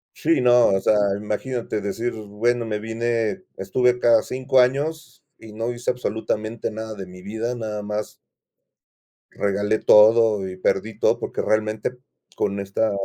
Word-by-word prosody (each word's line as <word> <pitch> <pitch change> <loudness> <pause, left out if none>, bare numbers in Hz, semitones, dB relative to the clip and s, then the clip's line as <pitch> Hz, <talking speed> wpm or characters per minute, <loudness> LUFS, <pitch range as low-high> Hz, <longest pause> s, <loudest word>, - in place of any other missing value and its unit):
Sí, 160 -4 +1
no, 120 -1 +5
o 95 0 +2
sea, 105 - +2 0.2
imagínate 110 +1 -3
decir, 115 +5 -3
bueno, 110 +3 -1
me 105 -1 -2
vine, 115 - -2
estuve 125 +6 +1
acá 120 -2 +3
5 130 0 0
años, 145 +6 0 0.2
y 110 -1 -12
no 115 +2 -3
hice, 120 +1 -4
absolutamente 110 -2 -2
nada 110 0 -6
de 95 -3 -8
mi 90 0 -13
vida, 110 +4 -3
nada 110 -3 -4
más 105 +1 -4 1.2
regalé 105 +2 0
todo, 105 -2 +5
y 95 0 -8
perdí 100 +4 -1
todo, - - +2
porque - - -3
realmente, 110 +3 -1 0.4
con 100 0 -1
esta 100 +2 -1
110 Hz, 145 wpm, -23 LUFS, 105-120 Hz, 1.2 s, no